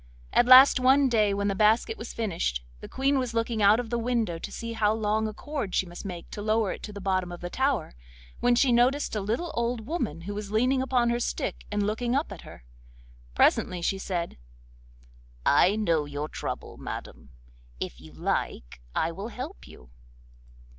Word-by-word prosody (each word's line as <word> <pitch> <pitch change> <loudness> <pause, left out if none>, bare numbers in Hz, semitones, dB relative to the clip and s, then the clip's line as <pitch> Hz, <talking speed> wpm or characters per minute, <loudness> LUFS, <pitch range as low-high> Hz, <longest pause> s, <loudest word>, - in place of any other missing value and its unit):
At 240 - +4
last 260 +1 +9
one 265 +2 +4
day 215 -4 +3
when 200 0 -1
the 200 - +1
basket 220 - +3
was - - -7
finished, 165 - -2 0.2
the - - -10
Queen 270 +1 +1
was 245 -3 -3
looking 230 -1 0
out 205 +3 +6
of 240 -2 -5
the 235 - 0
window 230 -8 -1
to - - -7
see 230 0 -5
how 210 -2 +2
long 220 0 0
a - - -4
cord 270 -5 -4
she - - +2
must 175 +3 -10
make 180 -3 -6
to 205 - -6
lower 215 -1 +1
it - - -7
to 210 - -7
the 200 - -8
bottom 185 -2 -1
of 175 - -7
the 175 0 -6
tower, 265 - 0 0.5
when 245 0 +3
she 250 +1 +3
noticed 245 +3 +2
a 210 - -1
little 235 - -2
old 235 -1 -2
woman 240 - -3
who 200 +4 -5
was 205 -1 -5
leaning 250 +5 +2
upon 250 -3 +1
her 240 - 0
stick - - -3
and 205 -1 0
looking 235 +4 -1
up 280 -4 -1
at 195 - -8
her. - - -13 0.7
Presently 180 - +3
she 195 +2 0
said: 175 - -4 1.1
'I 180 +7 +5
know 170 -8 +1
your 145 +1 -4
trouble, - - -6
madam. - - -8 0.5
If - - -6
you - - -13
like - - -3
I 165 - +1
will 195 +5 -6
help 260 +10 -8
you. 60 -1 -15
215 Hz, 195 wpm, -27 LUFS, 190-245 Hz, 1.1 s, last